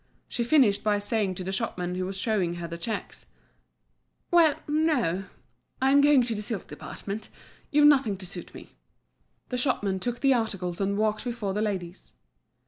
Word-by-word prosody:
She 240 - -2
finished 235 -6 +4
by 210 -1 +2
saying 205 -2 0
to 185 - -5
the 190 - -3
shopman 180 -2 -2
who 185 0 -2
was 190 0 -5
showing 190 -5 0
her 170 -1 -5
the 170 - -6
checks: 215 +4 -5 1.0
"Well—no; 300 - +2 0.5
I'm 270 +1 +5
going 285 -3 +5
to 235 -1 -2
the 210 - -4
silk 210 -2 -4
department; 205 +2 -7 0.4
you've 295 0 +4
nothing 265 -9 +4
to 185 - -7
suit 180 -1 -5
me." - - -11 0.8
The 250 - -2
shopman 205 -7 +1
took 240 +5 -3
the 275 -1 +5
articles 195 -7 -2
and 200 +1 0
walked 215 0 0
before 230 -5 -3
the 210 - -1
ladies. 190 -4 -4
210 Hz, 165 wpm, -27 LUFS, 190-250 Hz, 1.0 s, I'm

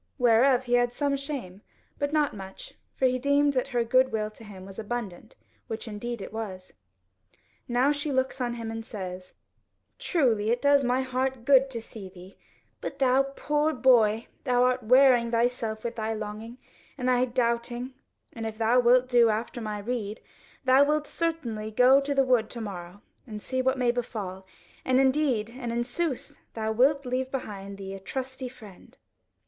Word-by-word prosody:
Whereof 245 +1 +4
he 245 -1 -3
had 245 0 +3
some 285 +1 0
shame, 270 -10 -5 0.4
but 285 0 -1
not 300 -5 +1
much, 190 -1 -9 0.2
for 265 - +1
he 255 0 +2
deemed 285 +2 +3
that 255 -1 0
her 245 -3 0
goodwill 230 -3 +2
to 220 - -15
him 195 -3 -11
was 195 +2 -10
abundant, 220 -3 -5 0.3
which 225 +1 -5
indeed 220 +1 -5
it - - -9
was. 190 -5 -6 0.9
Now 255 +3 +3
she 295 +1 -2
looks 260 0 -1
on 240 -1 -1
him 230 -1 -5
and 225 0 -5
says: 185 -4 -7 0.6
"Truly 230 - +1
it 240 +1 +2
does 285 0 +4
my 250 +1 +1
heart 260 -1 -2
good 270 -1 +5
to 235 -3 -5
see 205 -4 -9
thee: 185 +1 -14 0.5
but 275 - -5
thou 265 -1 +4
poor 300 +1 0
boy, 235 -4 +4 0.2
thou 245 -2 +2
art 255 0 +2
wearing 250 0 +5
thyself 230 -2 -1
with 235 0 -4
thy 220 0 -2
longing, 215 +3 -7 0.4
and 255 -2 -2
thy 250 0 +3
doubting, 240 +1 -1 0.4
and 225 -1 -4
if 220 -1 -7
thou 230 +2 +3
wilt 250 +1 +4
do 240 -2 +5
after 230 +3 -2
my 215 -1 -4
rede, 215 -1 -4 0.5
thou 260 +2 +6
wilt 300 +1 +1
certainly 265 -12 -3
go 250 +5 +5
into 280 0 -2
the 270 -1 +4
wood 245 -4 +2
to 240 - -7
morrow 190 -3 -7 0.2
and 215 -2 -6
see 260 0 -1
what 260 +1 +1
may 245 -2 +2
befall; 200 -6 -5 0.4
and 260 0 +2
indeed 265 -5 +2
and 240 -1 -5
in 240 +1 0
sooth 265 +2 -4 0.2
thou 220 -1 -1
wilt 275 +5 +3
leave 255 +1 -2
behind 200 -7 -6
thee 195 0 -7
a 195 - -7
trusty 260 +5 -5
friend." 220 -7 -15
245 Hz, 175 wpm, -27 LUFS, 220-260 Hz, 0.9 s, thou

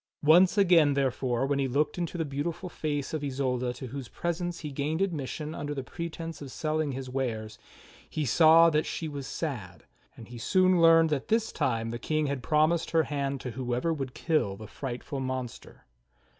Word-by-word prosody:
Once 175 +6 +6
again, 170 -7 +5
therefore, 130 -2 0
when 140 0 0
he 135 - +1
looked 140 +4 0
into 175 0 -3
the 165 - -1
beautiful 155 +6 -4
face 150 -3 -3
of 155 -2 -2
Isolda 130 -3 -1
to 125 - -8
whose 130 0 -6
presence 175 +3 -3
he 150 -2 -5
gained 150 +4 -2
admission 155 -4 -2
under 145 -1 -4
pretence 165 +1 -6
of 140 -2 -8
sell 155 +2 -2
ing 150 -3 -1
his 130 0 -5
wares, 115 -5 -3 0.5
he 155 - -2
saw 165 +5 +6
that 150 0 +1
she 165 - -4
w'as 140 -3 -6
sad; 120 - -5 0.3
and 115 - -11
he 120 -1 -9
soon 185 +6 +3
learned 165 -1 +6
that 140 -3 -1
this 225 0 +1
time 115 -3 -1
the 120 - -5
King 155 +2 0
had 140 -2 -2
promised 155 +4 +2
her 165 -1 +3
hand 140 -1 -2
to 125 - -5
whoever 125 +6 -1
would 135 -4 -5
kill 155 -12 0
the 110 +2 -10
frightful 130 +4 -5
monster. 130 -2 -5
145 Hz, 185 wpm, -28 LUFS, 130-165 Hz, 0.5 s, Once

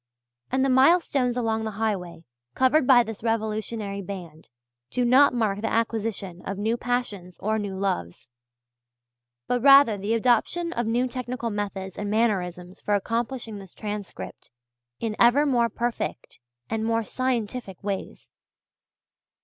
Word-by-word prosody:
And 260 +1 +2
the - - +1
milestones 260 -2 +3
along 225 -2 0
the 220 - -2
highway 190 -7 -2 0.3
covered 260 +1 +3
by 245 -3 +7
this 225 -2 -7
revolutionary 215 -2 -2
band, 175 -5 -9 0.4
do 250 - 0
not 260 +4 +6
mark 215 -4 0
the 225 - -1
acquisition 220 -5 -2
of 195 - -4
new 220 +3 0
passions 235 -8 -3
or 220 +2 -1
new 200 -2 -4
loves, 110 - -3 1.2
but 245 - 0
rather 275 -6 +7
the 210 +4 0
adoption 255 +9 +1
of 240 -1 -1
new 240 +3 +1
technical 250 -1 -4
methods 200 -2 -4
and 205 0 -3
mannerisms 185 -4 -1
for 205 - +1
accomplishing 230 +1 -2
this 190 -3 -13
transcript 210 -2 -7 0.5
in 220 -2 -2
ever 245 +5 +5
more 240 -4 +2
perfect 235 - -4 0.3
and 220 0 -2
more 230 0 +1
scientific 235 -5 -3
ways. 200 -1 -5
225 Hz, 135 wpm, -25 LUFS, 200-245 Hz, 1.2 s, by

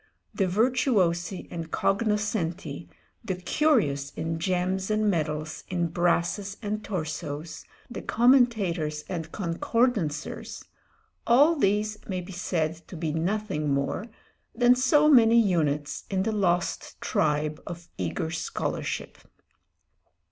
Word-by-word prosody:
The 195 - +1
virtuosi 195 -5 +1
and 165 -2 -5
cognoscenti, 195 -7 -1 0.3
the 190 - -2
curious 180 - +1
in 160 +2 -4
gems 185 +2 -1
and 215 0 +1
medals, 155 -2 -2
in 175 -2 0
brasses 175 +4 0
and 210 +1 -3
torsos, 155 -4 -5 0.2
the 240 - -7
commentators 210 - +2
and 165 -3 -5
concordancers, 185 - -1 0.6
all 285 +8 +6
these 210 -4 +1
may 185 -2 -2
be 180 +2 -8
said 165 -3 -1
to 180 - -9
be 155 -2 -2
nothing 165 -3 -1
more 140 +10 -1 0.5
than 245 +1 +6
so 265 +4 +4
many 235 -5 +7
units 150 -8 0
in 190 -1 0
the 220 - 0
lost 180 -5 -1
tribe 150 0 0
of 175 -1 -7
eager 95 - -2
scholarship. 165 0 -3
180 Hz, 110 wpm, -27 LUFS, 160-215 Hz, 0.6 s, many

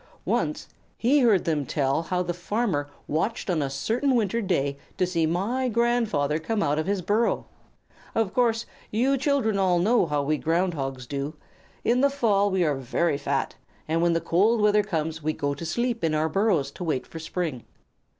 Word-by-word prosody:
Once - - -1 0.3
he 270 +6 +3
heard 225 -8 +4
them 155 -3 0
tell 140 +1 0
how 180 +2 -1
the 175 - -2
farmer 175 -5 -1 0.2
watched 195 +6 -1
on 165 -3 +1
a 140 - -1
certain 225 - 0
winter 230 0 +1
day 140 -9 0 0.2
to 185 - +2
see 170 -3 0
my 225 +10 0
grandfather 225 -11 +1
come 205 +6 -1
out 145 +2 +1
of 155 - -2
his 200 -2 0
burrow. 215 +6 +1 0.7
Of 220 -4 +1
course, 230 -2 +2 0.2
you 255 +6 +2
children 260 -7 +1
all 185 -2 +3
know 205 +2 +3
how 145 -1 0
we 150 +1 0
Ground 175 +3 +1
Hogs 135 -3 -4
do; 140 +4 -4 0.5
in 245 +2 +2
the 280 - +5
fall 210 -7 +2
we 190 -2 +1
are 150 -3 +2
very 140 +3 0
fat, 140 -1 -1 0.3
and 165 +1 +1
when 170 0 +3
the 165 - +1
cold 200 +8 +3
weather 210 0 +4
comes 160 -5 -3
we 155 +1 -1
go 145 -1 -1
to 160 +4 -6
sleep 235 +5 -1
in 160 -1 +1
our 155 +1 +1
burrows 170 -7 +1
to 180 - -7
wait 155 -6 -1
for 165 - -9
spring. 160 -6 -3
175 Hz, 190 wpm, -26 LUFS, 155-225 Hz, 0.7 s, the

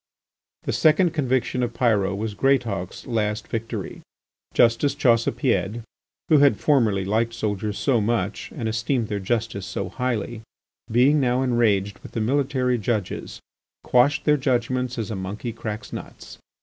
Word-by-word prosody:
The - - -2
second 165 +2 +4
conviction 130 -4 0
of 120 -1 -2
Pyrot 100 -5 +1
was 110 0 -3
Greatauk's 110 -6 0
last 105 -3 -1
victory. 115 -2 -5 0.5
Justice 120 +4 +3
Chaussepied, 115 -4 +1 0.4
who 155 -3 +5
had 140 -1 +5
formerly 110 -10 +2
liked 115 +3 0
soldiers 105 -1 -2
so 125 -5 +2
much, 105 -2 -2
and 120 -7 -3
esteemed 115 +1 -1
their 105 -1 -2
justice 100 -2 -2
so 100 -2 -4
highly, 120 0 -3 0.5
being 130 +6 +4
now 125 -1 +1
enraged 105 -6 +1
with - - -12
the - - -2
military 130 +1 +1
judges, 105 -2 -3 0.4
quashed 140 +4 +3
their 150 -1 +4
judgments 125 -1 -1
as 110 -2 -3
a - - -2
monkey 100 +5 -5
cracks 110 -2 -6
nuts. - - -9
115 Hz, 140 wpm, -23 LUFS, 105-130 Hz, 0.5 s, who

